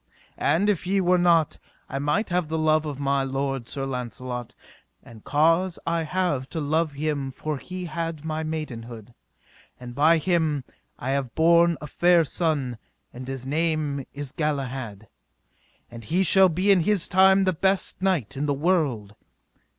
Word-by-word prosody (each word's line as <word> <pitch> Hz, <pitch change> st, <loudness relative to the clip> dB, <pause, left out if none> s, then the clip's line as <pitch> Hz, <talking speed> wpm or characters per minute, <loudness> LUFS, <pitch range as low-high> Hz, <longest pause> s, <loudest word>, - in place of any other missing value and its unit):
And, 165 Hz, +8 st, +2 dB
if 195 Hz, -4 st, 0 dB
ye 195 Hz, +1 st, +2 dB
were 180 Hz, -1 st, +3 dB
not, 170 Hz, -3 st, +3 dB, 0.3 s
I 135 Hz, -, -4 dB
might 150 Hz, +10 st, 0 dB
have 175 Hz, -2 st, 0 dB
the 160 Hz, +1 st, -2 dB
love 155 Hz, 0 st, +2 dB
of 145 Hz, -2 st, -5 dB
my 140 Hz, 0 st, +1 dB
lord 135 Hz, -2 st, -3 dB
Sir 135 Hz, -1 st, -3 dB
Launcelot; 125 Hz, -1 st, -5 dB, 0.5 s
and 110 Hz, -2 st, -14 dB
cause 165 Hz, +4 st, +2 dB
I 165 Hz, 0 st, 0 dB
have 155 Hz, -6 st, -1 dB
to 160 Hz, -, -4 dB
love 155 Hz, +1 st, 0 dB
him 145 Hz, -2 st, -2 dB
for 150 Hz, +2 st, -4 dB
he 185 Hz, +3 st, -7 dB
had 165 Hz, -1 st, -4 dB
my 155 Hz, 0 st, -2 dB
maidenhood, 120 Hz, -8 st, -6 dB, 0.7 s
and 125 Hz, -1 st, -9 dB
by 155 Hz, +5 st, +4 dB
him 160 Hz, -4 st, 0 dB, 0.3 s
I 130 Hz, -, -3 dB
have 135 Hz, -3 st, -2 dB
borne 170 Hz, +1 st, +4 dB
a -, -, -6 dB
fair 175 Hz, +3 st, +3 dB
son, 145 Hz, -7 st, -1 dB, 0.3 s
and 125 Hz, +1 st, -8 dB
his 135 Hz, -1 st, -5 dB
name 150 Hz, -1 st, -1 dB
is 145 Hz, -2 st, -7 dB
Galahad, 130 Hz, -9 st, -3 dB, 0.8 s
and 115 Hz, -1 st, -10 dB
he 175 Hz, -, +1 dB
shall 190 Hz, +1 st, +6 dB
be 185 Hz, +5 st, +2 dB
in 195 Hz, -, +5 dB
his 195 Hz, 0 st, +1 dB
time 190 Hz, +1 st, +5 dB
the 185 Hz, -1 st, +2 dB
best 190 Hz, +3 st, 0 dB
knight 170 Hz, -, 0 dB
of 145 Hz, +2 st, -2 dB
the 145 Hz, -, +1 dB
world. 140 Hz, -, 0 dB
155 Hz, 165 wpm, -25 LUFS, 135-170 Hz, 0.8 s, shall